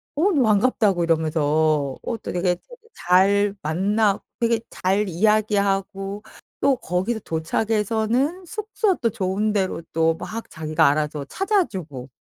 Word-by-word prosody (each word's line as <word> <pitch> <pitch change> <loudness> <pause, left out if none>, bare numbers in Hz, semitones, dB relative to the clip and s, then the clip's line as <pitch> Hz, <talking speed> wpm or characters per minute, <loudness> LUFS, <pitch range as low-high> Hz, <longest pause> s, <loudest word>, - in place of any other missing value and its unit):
"오 345 +8 +2
너무 290 -7 +3
반갑다."고 210 -4 +2
이러면서 155 -3 +1
어 230 - -3
또 - - -7
되게 180 0 +1
되게 485 - -17
잘 200 +3 +3
만나 200 +6 +1 0.2
되게 230 -1 +2
잘 195 +3 0
이야기하고 200 0 0 0.4
또 275 - +3
거기서 190 +6 -2
도착해서는 220 - -1
숙소 430 +1 -1
또 230 - 0
좋은 200 +2 -1
데로 190 -4 -1
또 165 0 +2
막 225 +7 -7
자기가 155 0 +1
알아서 150 0 -1
찾아주고 185 - -2
195 Hz, 275 characters per minute, -23 LUFS, 165-225 Hz, 0.4 s, 너무